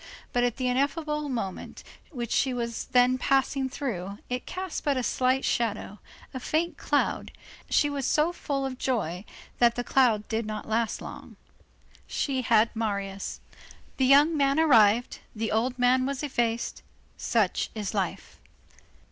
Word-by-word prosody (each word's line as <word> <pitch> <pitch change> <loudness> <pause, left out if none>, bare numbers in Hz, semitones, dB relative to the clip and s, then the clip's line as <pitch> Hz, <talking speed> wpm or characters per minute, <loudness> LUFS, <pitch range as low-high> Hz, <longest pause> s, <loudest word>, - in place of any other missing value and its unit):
But 245 - +2
at 245 -2 0
the 255 -2 -1
ineffable 300 +3 0
moment 210 -8 -5 0.3
which 240 -6 -5
she 260 -2 +1
was 235 -1 -3
then 250 +1 +3
passing 270 0 +1
through, 200 -8 -4
it 250 0 -3
cast 370 -1 -4
but 285 -2 +1
a 255 - -1
slight 255 +2 +1
shadow, 210 -3 -1 0.3
a 260 - -4
faint 320 +6 -1
cloud, - - 0 0.4
and - - -25
she 290 - +4
was 280 -2 -2
so 310 +3 +2
full 275 -5 -2
of 260 -1 -5
joy 205 -7 -2 0.3
that 235 -1 +4
the 245 - -2
cloud 240 -5 +2
did 225 -1 -2
not 215 0 -5
last 225 0 -1
long. - - -9 0.7
She 265 -3 -1
had 225 -1 +3
Marius. 200 -3 -3 0.6
The 260 - +3
young 290 +4 +6
man 280 0 +2
arrived, 235 -6 +4 0.2
the 220 0 -2
old 245 +4 0
man 255 +1 +3
was 280 +1 -3
effaced; 235 -4 -1 0.3
such 215 -6 0
is 210 -3 -3
life. 195 -4 -3
250 Hz, 155 wpm, -27 LUFS, 225-275 Hz, 0.7 s, young